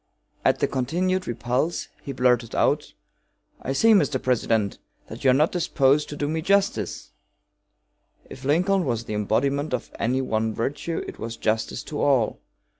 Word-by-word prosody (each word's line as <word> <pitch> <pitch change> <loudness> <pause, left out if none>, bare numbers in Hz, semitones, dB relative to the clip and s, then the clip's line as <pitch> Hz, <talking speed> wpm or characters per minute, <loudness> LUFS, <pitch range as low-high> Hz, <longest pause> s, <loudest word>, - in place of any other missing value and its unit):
At - - +3
the - - +1
continued 180 +8 -1
repulse 125 +7 -1
he 140 - -6
blurted 125 -3 +1
out: - - +1 0.7
"I 135 - -3
see, 225 +11 +5
Mr. 150 -9 +3
President, 115 -5 0 0.3
that - - -9
you 135 - +5
are - - +6
not 150 +4 +3
disposed 150 -4 +2
to 145 - -6
do 145 0 -2
me 160 +2 -1
justice!" 190 - 0 1.2
If 130 - -11
Lincoln 180 +7 +2
was 120 -6 -1
the 110 - -5
embodiment 135 +7 0
of 125 - -7
any 125 +3 +1
one 110 -3 -1
virtue 145 +7 -2
it - - -9
was 115 +1 -5
justice 110 +2 -1
to 150 - -5
all. 130 -6 +2
135 Hz, 160 wpm, -24 LUFS, 115-155 Hz, 1.2 s, are